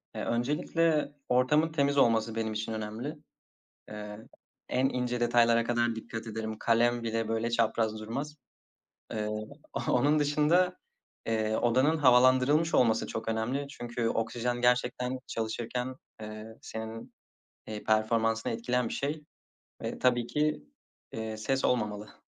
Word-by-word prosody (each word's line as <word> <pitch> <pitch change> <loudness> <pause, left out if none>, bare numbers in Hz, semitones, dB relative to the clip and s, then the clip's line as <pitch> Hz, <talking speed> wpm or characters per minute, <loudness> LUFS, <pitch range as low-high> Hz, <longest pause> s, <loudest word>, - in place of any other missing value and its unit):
Eee, - - -3
öncelikle 150 +5 +1 0.2
ortamın 150 +6 +3
temiz 140 -2 +1
olması 115 -3 +3
benim 110 -1 -1
için 110 +1 -3
önemli. 110 +7 -4 0.7
Eee, 105 0 -7 0.5
en 130 +1 +2
ince 125 -2 -2
detaylara 120 -1 +4
kadar 120 0 +1
dikkat 115 0 -6
ederim. 110 0 -4
Kalem 120 +1 +2
bile 115 -1 -1
böyle 115 +1 0
çapraz 110 -1 +1
durmaz. 140 +8 -5 0.8
Eee, 105 -1 -2 0.6
onun 145 +5 +3
dışında, 155 +5 +3 0.5
eee, 110 -1 0
odanın 130 +7 +3
havalandırılmış 130 +4 +5
olması 115 -3 +3
çok 110 0 -5
önemli. 120 +6 -1
Çünkü 120 -3 -3
oksijen 120 +2 -1
gerçekten 125 +1 +1
çalışırken, 120 +3 -3 0.3
eee, 110 0 -7 0.2
senin, 110 0 -7 0.5
eee, 105 -1 -6
performansını 115 +1 +1
etkileyen 120 +1 0
bir - - -4
şey 150 +2 -3 0.6
ve - - -4
tabii 120 -2 +2
ki, 150 - 0 0.5
eee, 110 -1 -4
ses 130 +5 0
olmamalı. 105 -4 -2
120 Hz, 125 wpm, -30 LUFS, 110-130 Hz, 0.8 s, havalandırılmış